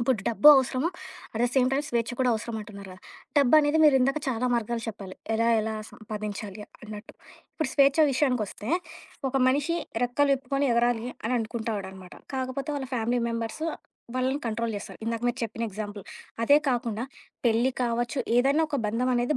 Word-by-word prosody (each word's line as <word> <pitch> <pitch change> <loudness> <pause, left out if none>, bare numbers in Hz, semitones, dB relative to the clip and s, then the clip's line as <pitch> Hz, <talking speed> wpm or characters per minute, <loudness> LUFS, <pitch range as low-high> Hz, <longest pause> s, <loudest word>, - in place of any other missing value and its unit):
ఇప్పుడు 235 0 +2
డబ్బు 235 +5 +2
అవసరం. 260 -1 +1 0.5
అట్ 220 - -2
ద - - +5
సేమ్ 255 -2 +4
టైమ్ 280 +2 +1
స్వేచ్ఛ 235 0 0
కూడా 255 -1 +3
అవసరం 225 +1 -4
అంటున్నారు 200 -2 -10
కదా! 185 - -14 0.4
డబ్బనేది 290 +2 +5
మీరిందాక 270 -1 +4
చాలా 250 -1 0
మార్గాలు 235 0 -1
చెప్పాలి. 195 -4 -7 0.2
ఎలా 230 +1 +2
ఎలా 220 0 -2 0.2
సంపాదించాలి 210 -1 -6 0.2
అన్నట్టు. 210 -1 -9 0.4
ఇప్పుడు 310 -4 -2
స్వేచ్ఛ 280 +1 +4
విషయానికొస్తే, 250 -6 -1 0.6
ఒక 270 - -2
మనిషి 290 +6 +2 0.3
రెక్కలు 250 +4 +2
విప్పుకొని 275 +1 -1
ఎగరాలి 235 0 +2 0.3
అనుకుంటాడనమాట. 210 -5 -5 0.2
కాకపోతే 260 +2 -3
వాళ్ళ 265 -2 -4
ఫ్యామిలీ 240 +1 0
మెంబర్స్ 230 +6 -4 0.5
వాళ్ళని 260 +2 0
కంట్రోల్ 230 0 -1
చేస్తరు. 200 - -8
ఇందాక 230 +1 -2
మీరు 240 - -2
చెప్పిన 230 +1 -5
ఎగ్జాంపుల్. 205 0 -6 0.4
అదే 285 +6 +6
కాకుండా 235 -3 -1 0.4
పెళ్లి 235 +3 +3
కావచ్చు, 240 +2 -1 0.2
ఏదైనా 275 +5 +4
ఒక 295 - -1
బంధం 235 +4 0
అనేది 245 +4 +1
240 Hz, 150 wpm, -27 LUFS, 220-265 Hz, 0.6 s, అదే